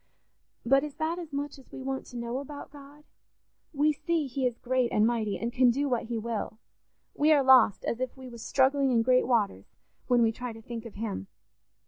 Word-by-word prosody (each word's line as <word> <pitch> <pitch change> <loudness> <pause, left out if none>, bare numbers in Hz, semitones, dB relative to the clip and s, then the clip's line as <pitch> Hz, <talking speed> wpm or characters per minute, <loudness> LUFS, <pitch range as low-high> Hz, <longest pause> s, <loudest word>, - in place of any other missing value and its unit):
But 275 +3 +4
is 295 -2 -6
that 325 +3 -2
as 330 -3 -8
much 285 0 -4
as 265 - -19
we 265 - -8
want 265 0 -4
to 245 - -9
know 235 +2 -3
about 285 0 -9
God? 290 +1 -14 0.7
We 300 +1 +2
see 330 0 -1
he 265 -1 -1
is 240 -1 -4
great 255 -1 0
and 210 - +3
mighty, 220 -3 0
and 235 +1 -4
can 255 -1 +5
do 280 +4 +1
what 245 -3 -1
he 235 0 -3
will: 220 -1 -4 0.6
we 300 +2 +3
are 290 -3 +5
lost, 255 -6 +5
as 235 - -2
if 255 +1 -4
we 260 -1 -10
was 235 -2 -10
struggling 275 +2 +2
in 235 -3 +3
great 255 +1 +3
waters, 205 - 0 0.3
when 245 -2 +4
we 225 - +3
try 245 +1 -6
to 225 - -12
think 235 -1 -7
of 220 - -13
him. 200 - -4
255 Hz, 215 wpm, -28 LUFS, 235-280 Hz, 0.7 s, can